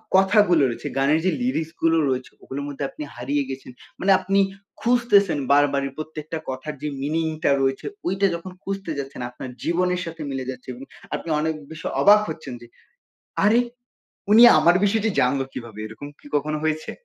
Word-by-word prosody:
কথাগুলো 190 -4 +5
রয়েছে, 115 - -5
গানের 145 +4 +3
যে 185 - +3
লিরিক্স 165 -11 -1
গুলো 165 0 +3
রয়েছে 130 0 -2
ওগুলোর 140 +2 -5
মধ্যে 145 0 -5
আপনি - - -8
হারিয়ে 140 +4 -1
গেছেন। 130 -1 -7 0.3
মানে 195 +1 +3
আপনি 195 +1 +1 0.4
খুঁজতেছেন 230 -8 +3
বারবারই 140 -1 +3
প্রত্যেকটা 155 0 -6
কথার 130 +4 -5
যে 150 - -3
মিনিংটা 155 +2 0
রয়েছে 135 0 0 0.2
ওইটা 195 +1 +2
যখন 175 +2 -8
খুঁজতে 195 -3 -4
যাচ্ছেন 135 -2 -6
আপনার 125 +1 -8
জীবনের 180 +1 +1
সাথে 165 -1 -7
মিলে 130 -1 -3
যাচ্ছে 130 0 -7
এবং 130 +3 -10 0.3
আপনি - - -6
অনেক 160 +1 0 0.2
বেশি 160 +1 -9 0.2
অবাক 210 +1 +8
হচ্ছেন 145 -5 -6
যে 120 - -12 0.8
আরেহ! 230 +4 +5 0.7
উনি 230 +3 +9 0.2
আমার 175 +1 +5
বিষয়টি 220 +2 +2
জানল 130 +2 +2
কীভাবে? 115 -3 -8
এরকম 110 +6 -9
কী - - -15
কখনো 150 +1 0
হয়েছে? 155 0 -1
155 Hz, 165 wpm, -23 LUFS, 135-190 Hz, 0.8 s, উনি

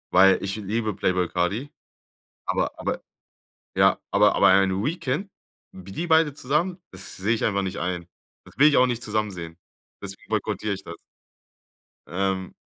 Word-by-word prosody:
Weil, 95 -1 +6
ich 100 +2 -2
liebe 110 +1 -2
Playboy 90 -2 0
Carti, 100 +11 -1 0.7
aber - - 0
aber - - -2 0.7
ja, - - +4
aber - - +4
aber - - +5
ein 95 +1 +3
Weekend, 155 - -2 0.4
wie 95 +1 -11
die 170 - -3
beide 160 -3 +4
zusammen, 150 +7 -1
das - - -7
sehe 100 +5 0
ich 115 - 0
einfach 100 -2 +1
nicht 95 -1 -4
ein. 90 -1 -3 0.4
Das - - -18
will 145 +3 +7
ich 150 - +4
auch 125 - +6
nicht 120 -2 -2
zusammen 105 -2 -1
sehen, 85 -3 -8 0.4
deswegen 95 -1 -9
boykottiere 105 -1 -1
ich 95 0 -7
das. 85 - -8 1.1
Ähm. 95 0 -2
100 Hz, 160 wpm, -25 LUFS, 95-125 Hz, 1.1 s, will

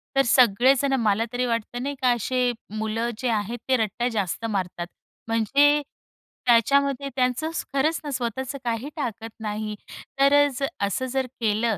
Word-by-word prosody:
तर 270 - +6
सगळे 245 +1 +5
जण 275 -1 +1
मला 215 +1 +2
तरी 250 +1 0
वाटतं 235 +1 -2
नाही 285 0 -3
का, 250 - +4
असे 245 +1 +1 0.3
मुलं 220 +2 -1
जे 250 0 -1
आहेत 220 +2 -1
ते 260 - +4
रट्टा 230 +2 -1
जास्त 205 +1 -2
मारतात. 180 -5 -3 0.4
म्हणजे 280 +7 +3 0.6
त्याच्यामध्ये 275 +3 +3
त्यांचं 255 +5 0 0.2
खरंच 305 +4 +1
ना, 290 - -4
स्वतःचं 260 +2 -3
काही 235 +4 -2
टाकत 225 -6 -4
नाही 215 0 -4 0.4
तर 275 +1 +5
अ, 290 0 +6 0.4
असं 260 +6 -2
जर 265 -1 +1
केलं 220 -1 +1
240 Hz, 155 wpm, -24 LUFS, 220-270 Hz, 0.6 s, तर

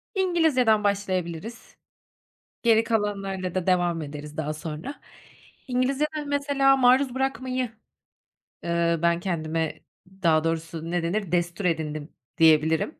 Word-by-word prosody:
İngilizceden 315 - +3
başlayabiliriz. 195 +1 -3 0.9
Geri 225 -1 +4
kalanlarla 195 -5 -2
da 185 -2 -2
devam 175 -3 +1
ederiz 150 0 -8
daha 155 -1 -2
sonra. 155 - -7 0.7
İngilizcede 275 +5 0
mesela 280 -1 +3
maruz 255 0 +4
bırakmayı, 260 -2 -2 1.0
ııı, 170 -1 +1
ben 170 0 +2
kendime, 165 -3 -2 0.4
daha 160 -2 +4
doğrusu 165 0 -3
ne 175 -1 0
denir, 185 +1 -2
destur 175 +2 -1
edindim 155 -3 -2 0.3
diyebilirim. 160 - +3
185 Hz, 105 wpm, -25 LUFS, 165-255 Hz, 1.0 s, Geri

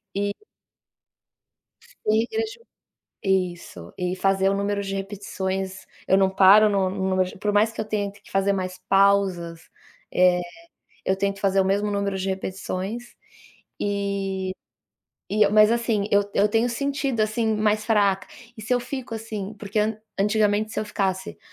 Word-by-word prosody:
e 200 0 0 1.7
e 215 +1 +4
regrediu 445 - -4 0.6
isso 175 - -2
e 180 0 -1
fazer 195 0 +2
o 195 - +2
número 200 0 -1
de 195 0 -4
repetições 190 -1 -4 0.2
eu 190 - +4
não 190 -1 +3
paro 200 +3 +7
no 195 -2 +1
no 190 0 -2
número 185 0 0
por 210 0 0
mais 215 +2 +3
que - - -5
eu - - -1
tenha 205 -2 -2
que 205 0 -19
fazer 195 +1 +2
mais 185 -1 -3
pausas, 195 -4 +2 0.4
eh, 180 -1 +4 0.6
eu 190 - +2
tento 200 0 -1
fazer 195 -1 +2
o - - +2
mesmo 200 +2 +1
número 200 -1 -1
de 190 +1 -2
repetições, 190 +4 -4 0.7
e 200 -2 -2 0.8
e 210 0 +4
mas 215 +1 +6
assim, 230 -4 0
eu 205 0 +3
eu 205 +1 +4
tenho 225 +3 +2
sentido, 275 -1 -1
assim, 220 +1 +1
mais 215 0 +1
fraca 200 -4 +2 0.3
e - - -7
se 225 - -2
eu 245 - +1
fico, 255 -2 -6
assim 215 -2 -5
porque 205 +1 -3 0.4
antigamente 210 +1 +2
se - - -2
eu - - -2
ficasse, 190 -1 -2
200 Hz, 155 wpm, -24 LUFS, 190-215 Hz, 1.7 s, paro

